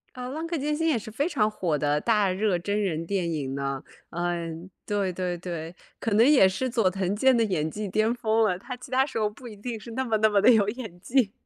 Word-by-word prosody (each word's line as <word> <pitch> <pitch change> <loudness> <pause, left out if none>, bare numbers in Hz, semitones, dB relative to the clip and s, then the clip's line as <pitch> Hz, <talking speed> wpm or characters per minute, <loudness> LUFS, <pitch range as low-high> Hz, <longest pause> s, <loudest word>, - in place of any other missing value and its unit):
嗯， 250 +1 -5
浪 320 +2 -4
客 335 -1 -2
剑 295 +2 -1
心 325 +2 0
也 300 - +3
是 220 0 -7
非 285 +9 0
常 215 -10 +1
火 170 -7 -1
的 145 +1 +1
大 210 0 +2
热 195 -1 +1
真 205 +4 -1
人 165 -4 -1
电 180 -2 -1
影 140 -4 -3
呢。 140 -1 -3 0.3
嗯， 170 0 -3 0.2
对 200 -2 0
对 180 -1 -3
对， 170 -1 -6 0.2
可 225 - -2
能 225 +3 +6
也 265 -9 +7
是 255 +7 -2
佐 225 -6 +2
藤 190 +1 -1
健 260 +4 +4
的 230 - +3
演 160 -7 0
技 210 +3 -5
巅 215 +5 +1
峰 225 -1 +2
了， 180 -3 +1
他 250 +6 -7
其 250 - -12
他 265 +1 +3
时 265 - -6
候 210 -1 +1
不 245 +4 -15
一 215 -3 -9
定 230 +2 -5
是 230 +2 -10
那 260 +3 -2
么 225 -2 0
那 215 0 +4
么 205 - +3
地 250 - +7
有 205 -2 +3
演 220 -7 -7
技。 240 -4 +2
210 Hz, 270 characters per minute, -26 LUFS, 175-240 Hz, 0.3 s, 也